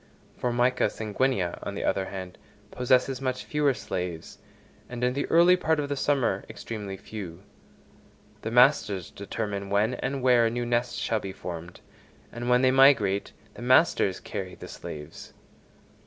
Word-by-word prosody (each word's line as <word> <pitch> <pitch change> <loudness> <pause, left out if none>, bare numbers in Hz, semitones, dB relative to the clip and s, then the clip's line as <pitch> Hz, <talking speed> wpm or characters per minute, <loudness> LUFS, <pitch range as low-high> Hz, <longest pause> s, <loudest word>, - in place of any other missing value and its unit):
Formica 125 +1 +1
sanguinea, 105 -4 -1
on - - -5
the - - -3
other 95 - 0
hand, 95 -2 -7 0.3
possesses 125 +1 +1
much 130 -1 -2
fewer 150 -2 +1
slaves, 90 -7 -5 0.5
and 125 0 -5
in 125 0 +2
the 140 +2 -2
early 175 +2 +6
part 160 -3 +1
of 145 -1 -2
the 145 - -1
summer 130 -9 +1
extremely 105 -4 -6
few. 95 -4 -8 1.0
The 110 - -3
masters 115 - +3
determine 100 -1 -4
when 105 +4 +2
and 130 +1 -3
where 120 -2 +5
a - - +1
new 120 +1 -2
nest 120 0 0
shall 110 - 0
be 100 -2 -6
formed, 85 -2 -8 0.5
and 120 +1 -4
when 125 +1 +4
they 130 - +5
migrate, 130 -8 +4 0.2
the - - -11
masters 125 - +3
carry 95 -2 -6
the - - -10
slaves. 75 +1 -9
120 Hz, 155 wpm, -27 LUFS, 100-130 Hz, 1.0 s, early